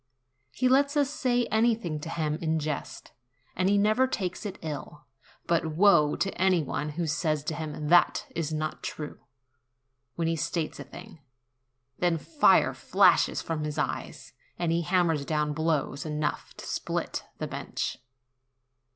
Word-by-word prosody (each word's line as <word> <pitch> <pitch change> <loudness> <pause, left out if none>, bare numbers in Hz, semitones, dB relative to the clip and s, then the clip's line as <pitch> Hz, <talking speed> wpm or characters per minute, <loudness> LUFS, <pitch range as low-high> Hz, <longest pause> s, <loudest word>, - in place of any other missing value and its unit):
He 255 - +1
lets 280 +3 +3
us 285 -1 +2
say 245 -4 +1
anything 220 -8 +1
to 160 - -7
him 155 -2 -2
in 160 -1 +1
jest, 150 -1 -4 0.4
and 185 +1 +2
he 205 - +4
never 215 +6 +3
takes 190 -4 -3
it 195 - -7
ill; 150 -1 -6 0.4
but 165 -2 0
woe 160 -6 +5
to 195 - -2
any 185 -3 +4
one 150 +2 -3
who 170 - 0
says 155 -1 0
to 155 - -3
him, 150 -1 -4
"That 175 +1 +4
is 160 -2 -2
not 155 0 -3
true," 150 -1 -6 1.0
when 165 -1 -1
he 165 - +1
states 160 0 -2
a - - -5
thing: 170 +3 -12 0.8
then 175 -2 +2
fire 300 - +4
flashes - - +3
from 160 -2 -3
his 150 0 -4
eyes, 150 - -4 0.2
and 170 -2 0
he 170 +1 +2
hammers 170 -3 +1
down 150 0 0
blows 150 -3 -1
enough 150 -1 -3
to - - -8
split - - -3
the - - -3
bench. - - -4
165 Hz, 155 wpm, -28 LUFS, 150-190 Hz, 1.0 s, woe